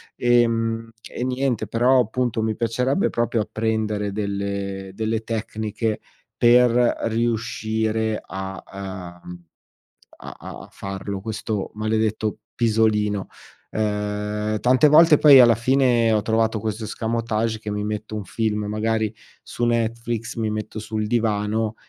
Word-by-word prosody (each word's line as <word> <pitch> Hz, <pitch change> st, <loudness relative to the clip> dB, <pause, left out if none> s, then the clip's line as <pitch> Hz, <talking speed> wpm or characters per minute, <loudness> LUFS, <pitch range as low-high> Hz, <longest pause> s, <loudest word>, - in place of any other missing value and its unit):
Ehm, 115 Hz, -1 st, +1 dB, 0.2 s
e -, -, -5 dB
niente 130 Hz, -2 st, -1 dB
però 125 Hz, +3 st, +3 dB
appunto, 120 Hz, 0 st, 0 dB
mi 110 Hz, 0 st, -1 dB
piacerebbe 125 Hz, -, 0 dB
proprio 115 Hz, -1 st, 0 dB
apprendere 110 Hz, -1 st, -1 dB
delle 100 Hz, -1 st, -3 dB
delle 110 Hz, +1 st, -1 dB
tecniche 110 Hz, -1 st, -3 dB, 0.4 s
per 120 Hz, 0 st, +6 dB, 0.3 s
riuscire 110 Hz, -1 st, -1 dB
a, 95 Hz, -1 st, -7 dB
uhm, 90 Hz, 0 st, -10 dB, 0.8 s
a -, -, -9 dB
a -, -, -10 dB
a -, -, -11 dB
farlo 95 Hz, 0 st, -6 dB
questo 105 Hz, -1 st, -4 dB
maledetto 110 Hz, 0 st, -1 dB, 0.2 s
pisolino. 105 Hz, -3 st, +1 dB, 0.5 s
Ehm, 105 Hz, 0 st, -2 dB
tante 125 Hz, +3 st, +4 dB
volte 155 Hz, 0 st, +7 dB
poi, 140 Hz, -3 st, +9 dB
alla 120 Hz, -2 st, +7 dB
fine 120 Hz, -2 st, +3 dB
ho 105 Hz, -, +2 dB
trovato 110 Hz, 0 st, +1 dB
questo 110 Hz, +1 st, -3 dB
escamotage: 115 Hz, 0 st, -2 dB
che 110 Hz, -1 st, -6 dB
mi 105 Hz, 0 st, -2 dB
metto 105 Hz, 0 st, -4 dB
un 105 Hz, -2 st, -4 dB
film 105 Hz, 0 st, -2 dB
magari 110 Hz, 0 st, -1 dB, 0.3 s
su 120 Hz, -, -3 dB
Netflix, 115 Hz, 0 st, -1 dB
mi 110 Hz, -1 st, -1 dB
metto 110 Hz, 0 st, -5 dB
sul 110 Hz, 0 st, -3 dB
divano, 110 Hz, -1 st, 0 dB
110 Hz, 125 wpm, -23 LUFS, 105-115 Hz, 0.8 s, poi